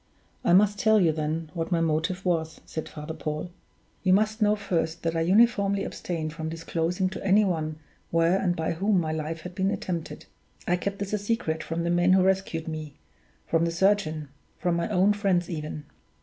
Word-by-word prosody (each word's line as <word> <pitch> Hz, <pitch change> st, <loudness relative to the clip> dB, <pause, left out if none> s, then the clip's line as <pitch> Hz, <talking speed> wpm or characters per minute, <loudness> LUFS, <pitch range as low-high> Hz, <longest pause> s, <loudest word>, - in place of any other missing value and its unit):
"I -, -, +3 dB
must 205 Hz, +2 st, +4 dB
tell 220 Hz, -1 st, +5 dB
you, 170 Hz, -4 st, +4 dB
then, 155 Hz, +1 st, -3 dB
what 165 Hz, 0 st, -3 dB
my 170 Hz, -, +2 dB
motive 165 Hz, +4 st, 0 dB
was," 160 Hz, -3 st, 0 dB
said 160 Hz, -, -5 dB
Father 150 Hz, +1 st, -7 dB
Paul. 155 Hz, +3 st, -4 dB, 0.5 s
"You 185 Hz, -1 st, +3 dB
must 215 Hz, +3 st, +2 dB
know 210 Hz, 0 st, +4 dB
first 170 Hz, -5 st, -2 dB
that 165 Hz, 0 st, -1 dB
I 165 Hz, -, +1 dB
uniformly 200 Hz, +1 st, +3 dB
abstained 160 Hz, -3 st, -4 dB
from 160 Hz, -1 st, -4 dB
disclosing 165 Hz, +3 st, -1 dB
to 190 Hz, -, -7 dB
any 200 Hz, +2 st, +4 dB
one 155 Hz, -4 st, -2 dB, 0.3 s
where 165 Hz, +3 st, +3 dB
and 180 Hz, -3 st, +1 dB
by 160 Hz, -1 st, -1 dB
whom 195 Hz, +3 st, +2 dB
my 160 Hz, -2 st, -1 dB
life 160 Hz, +1 st, -3 dB
had 180 Hz, -, -8 dB
been 190 Hz, +1 st, 0 dB
attempted. 175 Hz, -5 st, -4 dB, 0.4 s
I 180 Hz, -, +3 dB
kept 200 Hz, +2 st, -3 dB
this 200 Hz, 0 st, -4 dB
a 210 Hz, -, +1 dB
secret 205 Hz, -7 st, -1 dB
from 165 Hz, +1 st, -3 dB
the 170 Hz, -, 0 dB
men 175 Hz, +1 st, +4 dB
who 190 Hz, -1 st, +5 dB
rescued 190 Hz, -4 st, 0 dB
me 155 Hz, -2 st, -5 dB, 0.5 s
from 165 Hz, 0 st, +1 dB
the 170 Hz, -, +1 dB
surgeon 165 Hz, -4 st, +1 dB, 0.3 s
from 175 Hz, -1 st, 0 dB
my 170 Hz, +4 st, -1 dB
own 200 Hz, +1 st, +4 dB
friends 190 Hz, -4 st, 0 dB
even. 150 Hz, -2 st, -5 dB
175 Hz, 195 wpm, -27 LUFS, 160-195 Hz, 0.5 s, tell